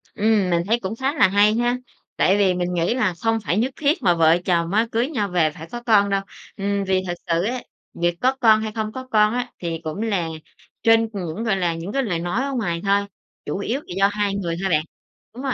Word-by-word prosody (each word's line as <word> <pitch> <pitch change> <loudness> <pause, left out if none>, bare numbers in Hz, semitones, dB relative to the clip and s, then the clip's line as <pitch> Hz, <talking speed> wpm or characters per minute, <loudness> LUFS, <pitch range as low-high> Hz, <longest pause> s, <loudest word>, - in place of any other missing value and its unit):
Ừm, 210 -3 +2
mình 170 -1 +2
thấy 230 +3 +2
cũng 195 0 -4
khá 265 +4 -1
là 300 - +5
hay 205 +2 +4
ha 240 +1 +1 0.4
tại 190 +2 +3
vì 195 -3 +3
mình 180 0 -2
nghĩ 175 +4 +1
là 215 -8 +1
không 225 0 +1
phải 180 - 0
nhất 245 +5 +1
thiết 310 +4 +1
mà 175 - +5
vợ 165 0 +4
chồng 170 -2 +1
á, 220 +3 +3
cưới 235 +3 +1
nhau 215 -10 -1
về 170 -4 +2
phải 160 +2 -10
có 240 - -5
con 205 -3 +4
đâu. 195 0 +1 0.4
Ừm, 200 0 -1
vì 190 -1 +1
thực 175 - -1
sự 170 0 +1
á, 245 +4 -2 0.3
việc 175 0 0
có 260 +1 +2
con 220 -2 +6
hay 220 0 -3
không 215 0 -3
có 260 +3 -8
con 210 0 +4
á, 245 0 -2
thì 165 -2 -3
cũng 160 +6 -4
là 200 -7 0 0.6
trên 225 0 +4
những, 185 +1 -4
gọi 220 -4 +1
là, 175 -3 0
những 165 +4 -6
cái 275 +4 0
lời 180 -8 -1
nói 175 +9 -1
ở 280 - -3
ngoài 175 -9 -2
thôi, 200 0 +2 0.4
chủ - - -3
yếu 230 +6 -2
là 180 - -9
do 195 0 +5
hai 205 -1 -1
người 175 -4 -2
thôi 195 - 0
bạn. 155 -3 +2 0.5
Đúng 250 +4 -8
rồi, 270 -2 0
200 Hz, 250 wpm, -22 LUFS, 175-225 Hz, 0.6 s, con